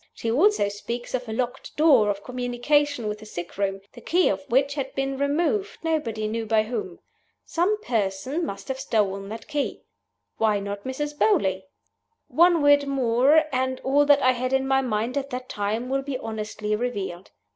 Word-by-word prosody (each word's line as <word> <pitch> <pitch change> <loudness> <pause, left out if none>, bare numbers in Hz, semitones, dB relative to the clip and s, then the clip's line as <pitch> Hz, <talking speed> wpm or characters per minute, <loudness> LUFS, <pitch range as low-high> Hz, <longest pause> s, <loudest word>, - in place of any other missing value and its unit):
She 225 - -2
also 335 - +3
speaks 235 +4 -5
of 250 -2 -3
a - - -3
locked 245 +2 -4
door 275 -9 +5
of 200 0 -2
communication 250 +1 0
with 210 0 -3
the 215 - -11
sickroom, 195 +1 -3
the 240 - -12
key 355 +9 +2
of 190 -1 -1
which 270 +3 +2
had 275 -2 -4
been 270 0 -1
removed, 330 +9 0
nobody 235 -10 -1
knew 225 +1 -3
by 215 0 +3
whom. 215 -6 -5 0.5
Some 380 +6 +1
person 230 - -1
must 195 -10 -5
have 265 0 -3
stolen 200 -5 -1
that 225 +1 -8
key. 295 -2 -3 0.6
Why 215 -2 +2
not 200 0 -6
Mrs. 295 +3 -3
Beauly? 190 - +2 0.6
One 340 -1 +4
word 285 0 +5
more, 270 +3 +4
and 260 0 0
all 285 +2 +3
that 285 -1 +5
I 255 - +6
had 255 +1 -2
in 265 0 +2
my 270 0 +3
mind 240 +2 -1
at 275 0 -7
that 255 0 -5
time 210 +4 -2
will 270 +1 0
be 270 -1 -4
honestly 215 -2 -3
revealed. 200 -6 -4
250 Hz, 180 wpm, -25 LUFS, 215-280 Hz, 0.6 s, I